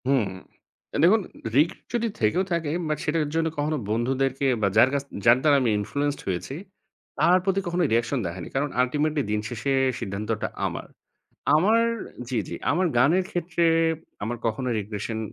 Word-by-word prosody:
হুম, 135 -5 +3 0.8
দেখুন 210 +6 +6 0.3
রিস্ক 150 +5 +5 0.2
যদি 235 -1 +1
থেকেও 110 - +2
থাকে 165 -3 0 0.2
বাট 155 - 0
সেটার 150 -1 +1
জন্য 165 0 +2
কখনো 150 +1 0
বন্ধুদেরকে 130 +4 0 0.2
বা 100 - +3
যার 120 +4 +7
কাছ 140 -1 0 0.2
যার 120 +1 +7
দ্বারা 150 -2 +5
আমি 125 - +2
ইনফ্লুয়েন্সড 145 +7 -2
হয়েছি 95 +8 -3 0.6
তার 180 +1 +5
প্রতি 195 0 +1
কখনো 175 +1 0
রিঅ্যাকশন 120 +3 +1
দেখায়নি। 85 0 -5
কারণ 145 +2 +1
আল্টিমেটলি 150 +4 +1
দিন 105 - +1
শেষে 120 +3 -2 0.3
সিদ্ধান্তটা 105 0 -3 0.2
আমার। - - -4 0.7
আমার 210 +9 +4 0.5
জি, 130 - -1
জি - - -5 0.2
আমার 180 +5 +2
গানের 160 +10 +4
ক্ষেত্রে 170 -1 -1 0.6
আমার 120 +3 -3
কখনো 125 +3 -2
রিগ্রেশন 105 +2 -4
140 Hz, 155 wpm, -25 LUFS, 115-165 Hz, 0.8 s, যার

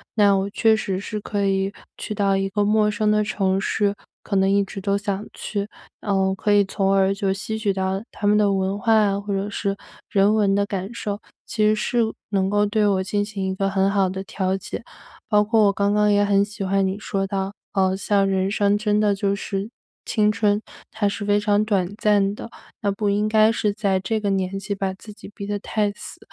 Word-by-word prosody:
那 205 -2 +5
我 195 +1 -1
确 220 +1 +3
实 195 -3 -2
是 210 +1 -5
可 205 -1 -2
以 195 0 +1 0.2
去 210 - -5
到 195 -1 +2
一 195 0 0
个 205 +1 0
陌 210 0 +3
生 210 0 +1
的 210 0 +3
城 195 -2 0
市， 205 -1 0 0.3
可 200 - -3
能 190 0 +3
一 200 0 +3
直 195 +1 -7
都 200 +1 +1
想 200 0 -3
去 205 -1 -4 0.3
呃， 190 -2 +1
可 210 - -1
以 205 -1 +5
从 195 0 -1
而 195 0 +3
就 195 -1 -1
吸 215 +3 -3
取 205 -2 +1
到 190 0 -1
他 205 - -6
们 205 +1 +4
的 210 -1 +3
文 195 +1 -1
化， 215 -3 +3
或 205 - -5
者 195 +1 -1
是 200 -1 -2 0.3
人 200 +1 +3
文 205 -2 +2
的 200 0 +2
感 195 0 -4
受。 205 -3 -4 0.3
其 215 - 0
实 215 0 +5
是 240 +3 0 0.3
能 195 -1 +1
够 205 0 +2
对 210 0 +1
我 195 -2 +2
进 205 +2 -1
行 205 -2 -4
一 190 - -2
个 195 +1 0
很 195 0 +2
好 195 -2 +2
的 190 +1 -4
调 190 0 -1
解， 195 - -7 0.5
包 210 -1 +4
括 220 0 +3
我 200 - +4
刚 200 +1 0
刚 210 0 +3
也 205 0 +3
很 200 0 +3
喜 205 0 -8
欢 195 0 +1
你 190 +2 -2
说 195 -2 -2
到， 195 0 -3 0.2
呃， 190 -1 +1
像 195 0 +1
人 190 0 0
生 205 -1 +2
真 210 0 +1
的 205 -1 +2
就 200 0 0
是 200 +1 -4 0.3
青 210 -1 +2
春， 210 0 +1 0.3
它 215 -2 0
是 200 +1 -3
非 205 0 +2
常 205 0 +2
短 195 -4 +1
暂 205 -2 +2
的。 - - -8 0.3
那 205 -2 +1
不 205 +1 -2
应 210 +1 +1
该 215 0 +5
是 215 -2 0
在 200 -2 0
这 220 +4 -1
个 205 -1 -1
年 195 0 -1
纪 200 +1 -4
把 195 -1 -2
自 210 +2 -12
己 210 0 -13
逼 200 - -7
得 205 - -1
太 210 0 -1
死， - - -10
200 Hz, 245 characters per minute, -22 LUFS, 195-210 Hz, 0.5 s, 那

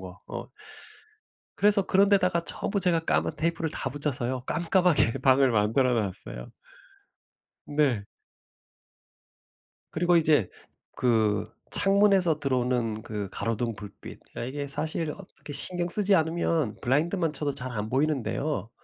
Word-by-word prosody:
거 95 0 -10
어. - - -6 1.1
그래서 205 -1 +3
그런 195 +1 +4
데다가 180 -4 +3
전부 200 +3 -2
제가 175 -3 +3
까만 - - +1
테이프를 165 0 -1
다 135 - -3
붙였어요. 130 -3 -2
깜깜하게 170 -8 +2
방을 135 0 +5
만들어 115 +4 +2
놨어요. 95 - -4 1.2
네. 140 -9 +1 1.9
그리고 175 +1 +3
이제 150 - +3 0.5
그 110 -4 +1 0.2
창문에서 195 -5 +3
들어오는 125 -5 0
그 105 -4 -5
가로등 115 +1 -2
불빛 100 0 -10 0.2
아 - - -4
이게 140 +3 -4
사실 155 +2 -3
어떻게 175 -4 -11
신경 175 +4 -2
쓰지 200 +2 +3
않으면 160 - 0
블라인드만 160 +5 +1
쳐도 145 0 -2
잘 130 0 -5
안 105 -2 -4
보이는데요. 140 -3 -1
145 Hz, 275 characters per minute, -27 LUFS, 115-170 Hz, 1.9 s, 방을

